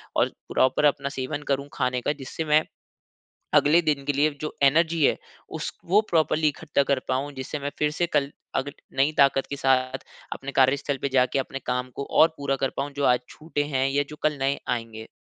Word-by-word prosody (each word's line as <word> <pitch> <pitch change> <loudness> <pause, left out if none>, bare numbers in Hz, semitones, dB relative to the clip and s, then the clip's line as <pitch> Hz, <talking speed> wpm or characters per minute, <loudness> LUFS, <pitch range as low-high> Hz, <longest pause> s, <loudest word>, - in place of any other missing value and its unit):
और - - +3 0.2
प्रॉपर 130 +3 +3
अपना 140 -1 +2
सेवन 140 +2 -4
करूँ 140 0 0
खाने 125 -1 -1
का। 145 - 0
जिससे 145 +5 -5
मैं 155 0 +4 0.9
अगले 155 +4 +5
दिन 150 -4 0
के 145 - 0
लिए 145 +2 +2
जो 155 - -4
एनर्जी 160 +3 +3
है - - +2 0.4
उस - - -4
वो 195 +5 +4
प्रोपर्ली 160 -1 +3
इकट्ठा 145 -1 0
कर 135 - +2
पाऊँ। 135 +3 -1
जिससे 130 +2 -5
मैं 145 0 -4
फ़िर 150 0 +2
से 175 +3 0
कल 140 -1 +2 0.3
अग 135 +2 -1 0.3
नई 140 +3 +3
ताकत 135 -1 +4
के 140 - -3
साथ 130 -1 +1 0.3
अपने 140 +1 -5
कार्यस्थल 140 +2 +2
पर - - +1
जाके 130 +1 +3
अपने 135 0 -3
काम 125 +1 -2
को 140 - -3 0.2
और 160 - +8
पूरा 140 -1 -1
कर 135 0 -1
पाऊँ 140 +1 -2
जो 140 - -1
आज 125 - -2
छूटे 155 -2 -3
हैं 130 +1 +2
या 140 +1 +1
जो 150 - -8
कल 150 -1 +1
नए 135 +1 0
आएँगे। 115 -2 -4
140 Hz, 205 wpm, -25 LUFS, 135-150 Hz, 0.9 s, और